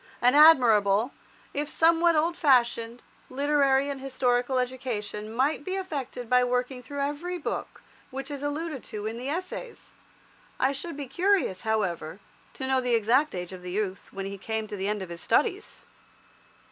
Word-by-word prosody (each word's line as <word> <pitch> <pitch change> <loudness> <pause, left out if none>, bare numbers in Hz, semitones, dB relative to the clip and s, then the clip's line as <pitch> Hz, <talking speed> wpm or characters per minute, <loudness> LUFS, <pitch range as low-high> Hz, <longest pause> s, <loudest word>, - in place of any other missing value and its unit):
An 245 +1 +4
admirable, 240 -7 +6 0.4
if 290 +1 -2
somewhat 335 +1 +4
old 330 +3 +2
fashioned, 240 -6 +2 0.3
literary 280 0 +2
and 280 -2 -4
historical 255 -1 0
education 235 -4 -3
might 270 +6 0
be 370 +5 -3
effected 275 -10 -4
by 250 +1 +4
working 250 +1 -1
through 285 +4 -5
every 295 +6 -2
book 310 - -5 0.3
which 270 +1 -6
is 285 -1 -5
alluded 290 -1 -3
to 210 -1 -6
in 225 +1 -3
the 255 +3 -4
Essays. 370 +9 -6 0.7
I 265 - +3
should 280 +3 -6
be 285 - -4
curious, 360 - +1
however, 190 -6 -2 0.4
to 265 - -4
know 265 -1 +2
the 250 -2 +1
exact 235 +5 +2
age 180 0 -5
of 185 - -9
the 180 - -7
youth 195 0 -3
when 195 0 -5
he 195 0 -6
came 220 +2 -3
to 210 - -5
the 195 0 -3
end 210 -1 -1
of 185 - -9
his 170 0 -7
studies. 410 -2 0
255 Hz, 170 wpm, -27 LUFS, 220-290 Hz, 0.7 s, admirable